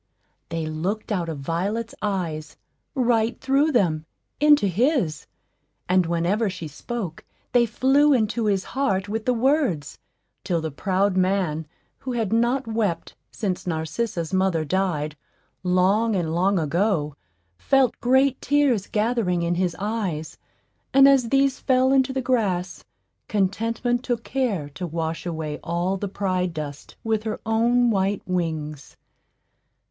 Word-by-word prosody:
They 165 -1 -3
looked 180 +9 -3
out 175 -5 -1
of 150 -4 -5
Violet's 200 +10 -2
eyes, 175 -7 -3 0.4
right 235 -3 +1
through 275 +4 +2
them, 165 - +1 0.3
into 295 -5 +5
his; 200 - 0 0.6
and 180 -1 +3
whenever 175 +6 +1
she 170 -3 -6
spoke 175 +3 -6 0.3
they 240 -1 +4
flew 275 +6 +3
into 230 -3 +1
his 195 -2 +1
heart 200 -9 -1
with 215 +1 -3
the 250 - +3
words, 240 - 0 0.4
till 170 -2 0
the 160 -1 -4
proud 190 +5 0
man, 185 -5 0 0.3
who 255 - -4
had 225 -4 -1
not 240 +4 +2
wept 220 -6 -2
since 190 -4 -3
Narcissa's 165 +3 -2
mother 185 -4 +1
died, 155 -4 -1 0.5
long 190 +5 +2
and 165 -4 -1
long 190 +3 +2
ago, 165 -2 0 0.4
felt 270 - +2
great 265 +2 +3
tears 280 -8 +2
gathering 210 -6 0
in 170 +1 +1
his 175 -1 0
eyes; 195 -6 -3 0.6
and 275 0 +8
as 265 -4 +4
these 275 +1 +2
fell 260 0 +3
into 265 0 +3
the 265 -1 -2
grass, 195 -8 -1 0.4
Contentment 225 +5 0
took 240 -3 -2
care 235 - -1
to 175 +5 -6
wash 165 +1 -3
away 160 -3 -4
all 175 +3 -1
the 200 +1 -3
pride 185 -3 -1
dust 145 -2 -7
with 220 -1 0
her 220 -1 -4
own 235 +2 +3
white 195 0 0
wings. 160 -5 -3
195 Hz, 135 wpm, -24 LUFS, 170-235 Hz, 0.6 s, and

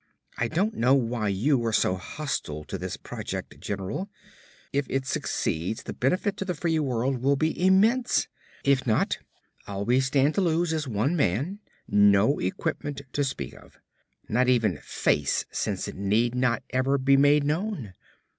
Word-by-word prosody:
"I 120 - 0
don't 190 - 0
know 125 +4 +3
why 115 -4 0
you 120 +7 +1
are 115 - 0
so 100 - +2
hostile 90 - -4
to 75 - -6
this - - -4
project, - - -6
general. 100 - -4 0.6
If 140 -1 0
it 135 0 -1
succeeds, 90 -3 -2
the - - -6
benefit 185 - 0
to 195 - -3
the 180 -2 -2
free 160 +1 0
world 130 -2 0
will 140 +2 +3
be 160 +4 -1
immense. 225 +7 +3 0.4
If 140 -2 +2
not, 110 - +1 0.5
all 100 0 -4
we 125 +3 +3
stand 135 +2 +2
to 200 - +1
lose 170 -1 +1
is 155 -3 -2
one 125 +8 0
man, 145 - 0 0.3
no 105 +5 +4
equipment 140 +9 -3
to 145 - +1
speak 130 - -4
of; - - -17 0.5
not 125 +3 +2
even 115 -10 +2
'face' - - 0
since - - -2
it - - -5
need 105 +5 +1
not 125 -2 +1
ever 130 +2 +2
be 135 +1 +4
made 145 +1 +5
known. 150 - -2
135 Hz, 165 wpm, -26 LUFS, 110-155 Hz, 0.6 s, made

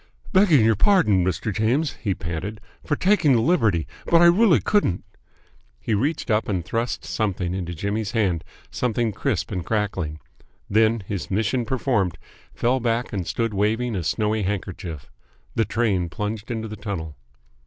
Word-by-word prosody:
"Begging 175 - +5
your 110 -1 +4
pardon, 110 - +4
Mr. 95 +4 -1
James," 125 +9 +1
he 100 -5 0
panted, 85 +6 -5 0.2
"for 145 - 0
taking 180 -5 +3
the 120 - +4
liberty, 110 - +2 0.2
but 170 - +5
I 175 - +6
really 175 - +5
couldn't!" 100 - +1 0.8
He 65 - -2
reached 135 +5 0
up 105 +1 +1
and 90 -5 -1
thrust 115 +1 -2
something 95 -5 -1
into 90 -2 -4
Jimmy's 100 +5 -2
hand, 95 -8 +1 0.3
something 120 -2 0
crisp - - -2
and 90 - -2
crackling. 95 -8 -2 0.5
Then, 110 +1 +3
his 100 -1 -4
mission 115 +5 0
performed, 115 - 0 0.4
fell 125 +3 +1
back 115 0 -1
and 95 -4 -3
stood 115 +6 -1
waving 110 +4 0
a 90 - -2
snowy 110 +2 0
handkerchief. 90 -6 -4 0.4
The 115 - +1
train 100 -6 0
plunged 105 +2 -4
into 110 -2 -3
the 110 - -7
tunnel. 85 -7 -5
110 Hz, 155 wpm, -23 LUFS, 95-120 Hz, 0.8 s, I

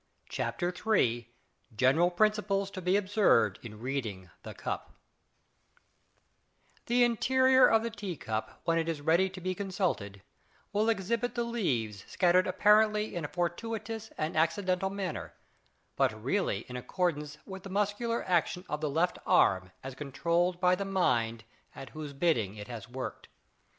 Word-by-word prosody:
CHAPTER 175 -1 -2
III 120 - +1 0.5
GENERAL 135 +9 +4
PRINCIPLES 200 0 +1
TO 190 - -6
BE 180 +2 +2
OBSERVED 190 - +3
IN 105 -3 -10
READING 110 -8 -4
THE - - -9
CUP - - -5 2.0
The 245 +1 +4
interior 260 +2 +5
of 225 0 +3
the 230 - -3
tea 200 -6 -5
cup 110 -3 -4
when 165 0 +2
it 165 0 -1
is 160 -3 -2
ready 165 +6 +3
to 185 0 -9
be 185 +1 -2
consulted 180 - -2 0.5
will 215 +2 +2
exhibit 230 +4 -1
the 240 - 0
leaves 125 - -2
scattered 180 0 +3
apparently 210 +3 +3
in 175 - -3
a - - -2
fortuitous 220 +6 -3
and 155 +1 -2
accidental 180 +4 +1
manner, 180 - -4 0.6
but 110 -1 0
really 190 - 0
in 125 - -10
accordance 150 +2 -2
with 190 -1 -8
the 195 - -9
muscular 205 +4 -1
action 180 +1 +1
of 150 - -3
the 155 - 0
left 165 +5 0
arm 95 -1 +4
as 135 0 -6
controlled 170 +6 0
by 180 0 +4
the 185 - 0
mind 115 - 0 0.3
at 135 - -8
whose 150 +2 -7
bidding 130 - +1
it 105 -1 -8
has 120 -1 -8
worked. 125 -1 -6
175 Hz, 150 wpm, -30 LUFS, 130-205 Hz, 2.0 s, interior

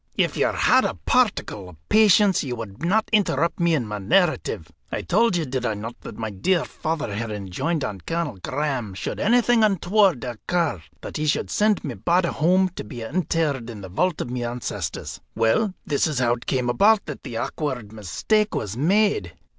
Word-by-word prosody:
"If - - +1
you - - +2
had - - +3
a - - -1
particle 195 - 0
of 90 - -14
patience, 210 -3 +5
you 125 -3 -3
would 115 +2 -8
not 215 +6 +2
interrupt 170 -6 +2
me 170 -1 +3
in 130 -6 -1
my 105 -1 -5
narrative. 105 - +1 0.2
I - - -3
told 220 +1 +2
you, 165 - -1
did 130 -1 -3
I 110 -3 0
not, 110 +3 -6
that - - -9
my 110 -1 -4
dear 165 - +1
father 155 -8 -3
had 115 +2 -3
enjoined 105 - -2
on 100 -6 -4
Colonel 165 - -3
Graham, 130 -8 -2
should 95 - -4
anything 240 +1 +3
untoward 195 - +3
occur, 125 - -1 0.2
that - - -6
he 155 0 -1
should 145 - 0
send 210 -1 +2
my 140 - -4
body 170 - +1
home 185 +4 +2
to - - -4
be 115 +2 -8
interred 145 -3 -1
in 110 -3 -8
the 95 - -8
vault 175 - 0
of 120 - -5
my 125 - -3
ancestors? 120 0 -4
Well, 115 - +2
this 145 +2 +1
is 150 -3 -2
how 120 -2 +3
it 120 - -7
came 125 -2 0
about 205 - +4
that 150 -4 -7
the 115 - -6
awkward 125 -7 -3
mistake 210 - 0
was 105 -1 -3
made. 165 - +2
145 Hz, 195 wpm, -23 LUFS, 115-185 Hz, 0.2 s, patience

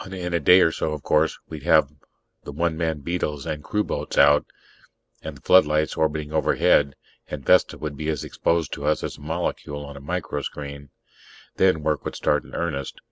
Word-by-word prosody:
In 90 -2 -5
a 85 - +2
day 90 +5 +6
or 80 - +4
so, 80 - -2
of 75 -3 -6
course, 80 +1 +2
we'd 80 -2 -8
have 80 -2 +4 0.5
the - - -7
one 85 +3 -1
man 80 -2 -2
beetles 75 -3 -3
and 75 -1 -4
crewboats 105 +4 -3
out, 75 0 +5 0.7
and - - -7
the - - -20
floodlights 75 -4 +4
orbiting 75 -1 -1
overhead, 70 -3 +3 0.3
and 70 -3 -7
Vesta - - +4
would 75 -2 -5
be 75 +2 -4
as 75 - -2
exposed 85 -2 -1
to 70 - -5
us 75 - +1
as - - -5
a - - -16
molecule 75 -2 -4
on 70 0 -10
a 70 - -10
microscreen. 70 -3 -5 0.7
Then 95 -5 +3
work 75 -1 0
would - - -5
start - - +1
in - - -12
earnest. 75 -6 -3
75 Hz, 190 wpm, -24 LUFS, 75-85 Hz, 0.7 s, day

